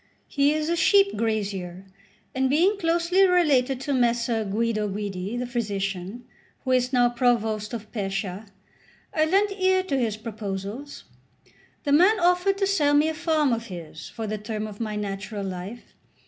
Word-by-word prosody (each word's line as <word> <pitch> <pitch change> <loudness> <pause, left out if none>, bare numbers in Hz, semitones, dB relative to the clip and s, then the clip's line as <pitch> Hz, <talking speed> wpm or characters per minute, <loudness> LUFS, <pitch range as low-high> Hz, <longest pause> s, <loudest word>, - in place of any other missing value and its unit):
He 285 0 +2
is 310 0 -1
a 340 - +1
sheep 395 +3 +4
grazier; 195 -4 -3 0.5
and 260 0 +1
being 365 +9 +3
closely 340 +2 +2
related 280 -8 +3
to 280 +1 -2
Messer 235 -2 +1
Guido 215 +1 -1
Guidi, 200 +1 -4
the 250 - -2
physician, 205 -2 -3 0.4
who 260 - -1
is 250 0 +2
now 245 -2 +4
provost 225 -3 0
of 220 -3 -7
Pescia, 195 -1 -4 0.7
I 310 -1 +3
lent 395 +5 +2
ear 375 -1 +2
to 280 -8 -1
his 220 -4 -1
proposals. 215 +4 -6 0.8
The 285 - -1
man 370 +9 +5
offered 360 +3 +2
to 395 - +1
sell 300 -7 +2
me 300 +2 +4
a - - -2
farm 310 -5 +1
of 230 0 -3
his 175 -5 -9
for 225 - -6
the 215 0 -3
term 215 +1 -4
of 210 -1 -9
my 215 -2 -3
natural 200 0 -4
life. 190 +5 -7
240 Hz, 160 wpm, -25 LUFS, 210-310 Hz, 0.8 s, man